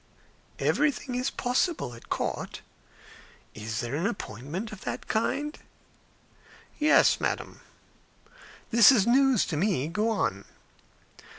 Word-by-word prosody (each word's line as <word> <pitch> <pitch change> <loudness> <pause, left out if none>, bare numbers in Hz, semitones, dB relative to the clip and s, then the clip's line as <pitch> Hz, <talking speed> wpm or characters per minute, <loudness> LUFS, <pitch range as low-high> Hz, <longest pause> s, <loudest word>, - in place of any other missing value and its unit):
"Everything 285 -3 0
is 250 +1 0
possible 250 - -1
at 115 - -14
court. - - -3 0.9
Is 110 +1 -4
there 120 +1 -5
an 170 +6 0
appointment 165 - -5
of 205 -3 -10
that - - -5
kind?" 290 +7 -1 1.2
"Yes, 305 +1 +5
madam." - - -3 1.1
"This 230 0 +8
is 220 -7 +3
news 260 -1 +4
to 155 - -3
me. 170 -6 0
Go 210 +6 0
on." 140 - -1
215 Hz, 110 wpm, -27 LUFS, -, 1.2 s, This